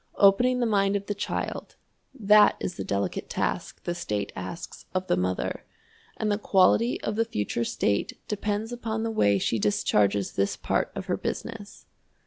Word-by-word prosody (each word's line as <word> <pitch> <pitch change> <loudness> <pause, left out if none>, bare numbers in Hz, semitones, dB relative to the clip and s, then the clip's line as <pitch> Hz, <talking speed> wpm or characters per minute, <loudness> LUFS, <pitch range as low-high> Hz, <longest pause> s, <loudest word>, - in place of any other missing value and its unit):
Opening 245 +6 +5
the - - +3
mind 200 -2 +2
of 200 0 -2
the 205 - -2
child, 200 - -4 0.4
that 210 -5 +5
is 180 - -3
the - - -5
delicate 100 0 -2
task - - -2
the 175 - -2
state 105 -13 -3
asks 95 - -7
of 185 0 0
the - - +2
mother, 90 +1 -2 0.5
and 215 -1 0
the 205 - 0
quality 205 +4 +3
of 215 - -2
the 225 - +2
future 115 - -2
state 100 -3 -1
depends 210 +2 -2
upon 225 -2 -3
the 225 - -1
way 100 - +3
she 110 +3 0
discharges 100 -1 +2
this 100 0 0
part - - -1
of - - -4
her - - -1
business. - - -6
195 Hz, 170 wpm, -27 LUFS, -, 0.5 s, Opening